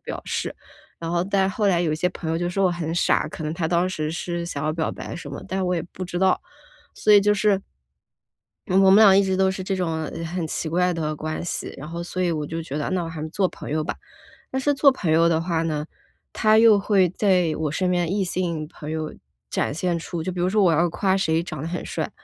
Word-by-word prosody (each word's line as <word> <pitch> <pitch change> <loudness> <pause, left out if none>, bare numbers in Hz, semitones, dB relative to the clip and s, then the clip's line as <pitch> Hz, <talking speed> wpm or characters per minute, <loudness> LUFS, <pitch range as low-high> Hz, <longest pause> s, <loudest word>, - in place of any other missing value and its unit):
表 - - -5
示。 - - -2 0.5
然 165 - -5
后 170 0 +1
但 190 0 +1
是 190 - -5
后 210 - +1
来 175 -2 +3
有 165 -3 +1
一 155 - -1
些 180 +3 +1
朋 165 -3 -6
友 165 - 0
就 175 +1 -1
说 195 +2 +1
我 185 - +4
很 165 -2 -3
傻， 175 - +2
可 160 - -7
能 155 +1 -2
他 165 -2 -1
当 175 +1 +2
时 155 -4 -3
是 170 +1 -3
想 150 -4 -4
要 155 - +1
表 160 0 -1
白 - - -7
什 165 -4 -7
么， 140 - -6
但 190 - -3
是 - - 0
我 180 0 0
也 165 - -2
不 185 - -5
知 175 0 -4
道， 190 0 +3 0.5
所 210 - +3
以 205 - +8
就 210 +1 +3
是 205 -1 +2 1.1
我 190 +1 +5
们 - - +8
俩 195 -2 +8
一 200 - +5
直 190 -1 0
都 190 0 +3
是 190 0 -4
这 195 +1 -1
种 165 -4 -1 0.2
很 170 +1 -3
奇 160 - -3
怪 180 +2 +2
的 155 -2 -2
关 155 +2 -4
系， 175 - -4
然 150 - -8
后 170 +1 -5
所 185 +1 -4
以 175 -2 +1
我 150 -2 -2
就 165 +2 -4
觉 150 -2 -5
得 150 - -2
那 185 -2 0
我 165 - -5
还 160 -2 -6
是 155 - -4
做 190 +4 +1
朋 - - -9
友 155 +1 0
吧。 - - -3 0.6
但 265 - -1
是 290 +2 +2
做 275 0 +5
朋 185 -11 -2
友 165 +1 +5
的 160 -1 +2
话 165 -1 -1
呢， 155 -2 -2 0.5
他 215 0 +4
又 220 -2 +7
会 195 -3 +3
在 180 -4 +2
我 155 -2 -1
身 180 +2 0
边 175 -1 0
异 200 0 +1
性 175 -4 -2
朋 150 0 -9
友 155 -1 -3 0.4
展 - - -1
现 170 +3 -1
出 165 0 -5
就 185 - -2
比 180 - -6
如 180 - +2
说 205 +1 +3
我 175 - +5
要 170 +2 +2
夸 190 +3 +1
谁 165 -4 +1
长 155 -5 -6
得 155 - -4
很 175 +1 -4
帅， - - -3
175 Hz, 285 characters per minute, -23 LUFS, 160-190 Hz, 1.1 s, 以